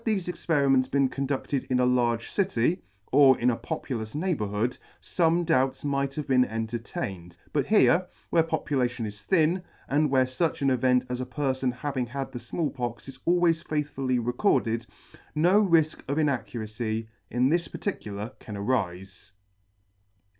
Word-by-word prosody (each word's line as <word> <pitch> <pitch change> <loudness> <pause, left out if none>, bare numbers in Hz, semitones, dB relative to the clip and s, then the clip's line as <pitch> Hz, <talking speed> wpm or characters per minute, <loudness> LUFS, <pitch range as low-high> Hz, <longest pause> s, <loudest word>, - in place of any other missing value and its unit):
Had - - -10
thefe 185 - -5
experiments 140 -7 +2
been 135 -1 +2
condudted 140 0 -2
in 125 -1 0
a 125 - +4
large 120 -2 +1
city, 180 - +1 0.3
or 135 -2 +7
in 125 +1 +3
a - - -1
populous 115 -6 -5
neighbourhood, 120 - -1 0.2
fome 170 0 +1
doubts 135 -5 +1
might 140 -1 -1
have 150 - -4
been 130 -1 +4
en 115 -2 -2
tertained; 100 -6 -5 0.2
but 145 - +1
here, 185 -4 +4 0.2
where 165 - +5
population 135 -7 -1
is 105 -1 -8
thin, 170 - +2 0.3
and 150 +2 +2
where 130 -1 +4
fuch 140 +4 -1
an 135 - +3
event 125 0 +3
as 125 0 -3
a - - -2
perfon's 130 -2 -1
having 130 -1 -2
had 135 +2 -5
the 125 - -6
Small 155 +3 -2
Pox 120 -1 -5
is 135 -1 -10
always 170 -1 +3
faith 150 -3 -2
fully 130 -2 0
recorded, 120 - +1 0.5
no 180 +7 +4
rifk 165 -5 +3
of 140 +2 -1
inaccuracy 115 -6 -2 0.2
in 125 +2 +2
this 170 +2 +1
particular 105 - -5
can 105 - -8
arife. 95 -5 -3
130 Hz, 160 wpm, -27 LUFS, 120-155 Hz, 0.5 s, or